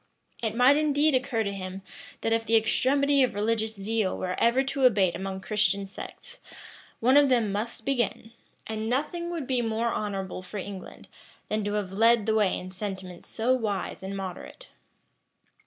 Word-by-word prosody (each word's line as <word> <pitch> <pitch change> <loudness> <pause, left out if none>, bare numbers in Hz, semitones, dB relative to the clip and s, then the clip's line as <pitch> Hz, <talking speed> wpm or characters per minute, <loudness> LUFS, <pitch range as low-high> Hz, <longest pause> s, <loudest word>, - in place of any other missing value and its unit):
[*] - - -27
It 220 -2 -1
might 255 +4 +6
indeed 300 0 +3
occur 255 -3 +1
to 200 -1 -3
him, 190 0 -6 0.4
that 225 - +1
if 225 0 +1
the 225 +1 +2
extremity 275 +5 +3
of 255 - +2
religious 220 +1 0
zeal 210 0 -1
were 180 0 -2
ever 235 +3 +4
to 270 0 0
abate 195 -7 +4
among 190 0 -4
Christian 200 -1 +1
sects, 195 - -10 0.6
one 255 +4 +5
of 285 -1 +6
them 235 -5 +2
must 220 +2 -4
begin; 235 -4 -1 0.3
and 220 0 -3
nothing 320 +7 -1
would 335 -5 -3
be 250 -1 +1
more 225 0 0
honorable 195 -3 -3
for 185 +3 -8
England, 195 -1 -8 0.4
than 215 0 0
to 205 - -1
have 200 -3 -2
led 225 +1 +4
the 220 - +2
way 210 -3 +2
in 185 0 -7
sentiments 190 -2 -6
so 235 +3 +1
wise 215 -8 -2
and 195 +1 -5
moderate. 195 - -7
220 Hz, 175 wpm, -27 LUFS, 195-250 Hz, 0.6 s, might